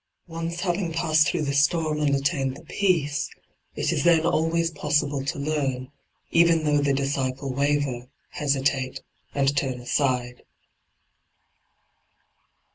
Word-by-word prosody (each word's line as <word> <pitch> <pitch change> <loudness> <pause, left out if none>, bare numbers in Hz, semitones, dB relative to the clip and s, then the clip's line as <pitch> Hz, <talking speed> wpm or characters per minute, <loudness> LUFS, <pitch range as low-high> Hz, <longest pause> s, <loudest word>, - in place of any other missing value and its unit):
Once 165 0 -5
having 175 -2 -1
passed 160 -2 +3
through 170 -4 0
the 140 -1 -1
storm 150 +2 +2
and 145 -2 +2
attained 135 -1 -1
the 165 - -15
peace, 160 -6 0 0.5
it - - 0
is - - 0
then 165 -2 +4
always 165 0 +1
possible 145 -3 0
to 140 - -3
learn, 140 -3 -2 0.4
even 165 -1 +4
though 150 -1 +2
the 145 -1 +1
disciple 135 -1 -1
waver, 140 -3 0 0.2
hesitate, 135 -2 -1 0.3
and 140 0 +2
turn 130 -3 -1
aside. 125 -1 -1
145 Hz, 120 wpm, -25 LUFS, 135-165 Hz, 0.5 s, then